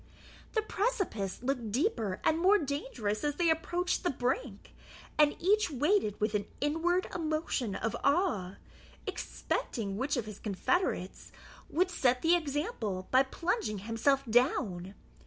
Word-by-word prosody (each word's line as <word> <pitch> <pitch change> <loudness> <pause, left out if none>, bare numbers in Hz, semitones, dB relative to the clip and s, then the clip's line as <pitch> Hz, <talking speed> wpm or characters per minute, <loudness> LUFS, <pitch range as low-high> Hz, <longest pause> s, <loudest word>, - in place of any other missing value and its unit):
The 440 - +1
precipice 390 - -1
looked 245 -5 -1
deeper 230 - 0
and 320 - +3
more 385 +4 +6
dangerous 265 - -2
as 295 -1 0
they 340 0 +3
approached 350 +3 0
the 355 - +2
brink, 250 - -2 0.4
and 300 -1 +4
each 405 +2 +3
waited 295 - +1
with 215 0 0
an 205 -1 -1
inward 330 +5 +1
emotion 310 - -1
of 220 +2 -2
awe, 280 - +1 0.5
expecting 200 -4 -3
which 275 +4 0
of 235 - -1
his 215 -1 -8
confederates 205 - -1 0.4
would 365 +3 +1
set 255 -7 +2
the 335 +2 +5
example 285 - -2
by 260 - +6
plunging 275 - -1
himself 230 +7 +1
down. 215 - +1
275 Hz, 135 wpm, -31 LUFS, 215-345 Hz, 0.5 s, more